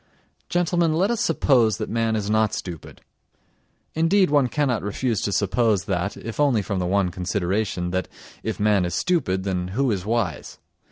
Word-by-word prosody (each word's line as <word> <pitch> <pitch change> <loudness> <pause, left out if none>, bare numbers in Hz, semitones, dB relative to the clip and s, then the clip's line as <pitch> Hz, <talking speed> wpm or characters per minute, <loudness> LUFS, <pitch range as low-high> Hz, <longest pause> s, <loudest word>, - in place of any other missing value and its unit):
Gentlemen, 175 -2 +1
let 190 +7 +2
us 235 -1 -1
suppose 125 - +3
that - - -4
man 115 -1 0
is 105 -2 -2
not 110 0 +2
stupid. 85 -5 -8 0.9
(Indeed 165 +2 +3
one 145 -3 +4
cannot 125 -2 0
refuse 110 +2 -1
to 100 - -1
suppose 105 0 +1
that, 95 +1 -2
if 115 +4 -7
only 135 -8 +3
from 100 -1 -2
the 90 - -1
one 95 -1 +1
consideration, 90 0 -2
that, 95 -1 -1 0.3
if 110 - -4
man 105 -2 +3
is 85 - -2
stupid, 125 - 0
then 90 -2 -2
who 135 -1 +2
is 95 -4 -2
wise?) 110 -5 -2
110 Hz, 170 wpm, -23 LUFS, 95-135 Hz, 0.9 s, one